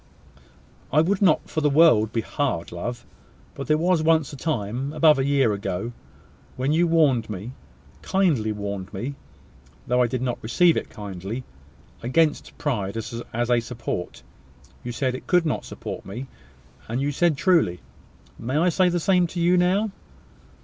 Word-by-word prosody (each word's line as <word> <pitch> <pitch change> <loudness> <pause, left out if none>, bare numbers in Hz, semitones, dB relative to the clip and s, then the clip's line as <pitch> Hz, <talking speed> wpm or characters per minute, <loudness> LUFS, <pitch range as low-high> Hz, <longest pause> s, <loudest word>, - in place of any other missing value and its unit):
"I 150 - +5
would 190 +5 0
not 195 - +3
for 155 - -2
the 150 - +3
world 140 -8 +5
be 115 - 0
hard, 125 -11 -2
love. 120 +8 -5 0.5
But 140 - -7
there 155 - +3
was 175 0 +2
once 160 -3 +2
a - - -5
time, 130 -2 -2
above 155 -2 +5
a 135 - +1
year 140 -6 +3
ago, 100 +2 -3 0.7
when 135 +4 0
you 170 +2 +3
warned 145 -9 +3
me, 105 +3 -6 0.5
kindly 165 - +1
warned 100 -2 -5
me, 125 +9 -4 0.7
though 125 +1 +2
I 125 - +3
did 125 +1 -3
not 125 -2 -2
receive 165 +10 +3
it - - -3
kindly, 100 +3 -6 0.6
against 150 +5 +1
pride 105 -9 -2
as 115 +1 -5 0.3
a 120 - +4
support. 115 -6 -5 0.6
You 120 - -4
said 130 +2 -1
it 130 - -8
could 180 -2 +3
not 155 - -1
support - - -7
me; 115 +7 -7 0.6
and 115 +3 -2
you 140 +2 0
said 160 +1 +2
truly. 160 - +2 0.6
May 130 +5 -2
I 175 +3 +3
say 180 +2 +3
the 175 0 0
same 180 +1 +3
to 175 - -6
you 175 +1 +4
now?" 190 +4 +2
135 Hz, 165 wpm, -24 LUFS, 115-165 Hz, 0.7 s, I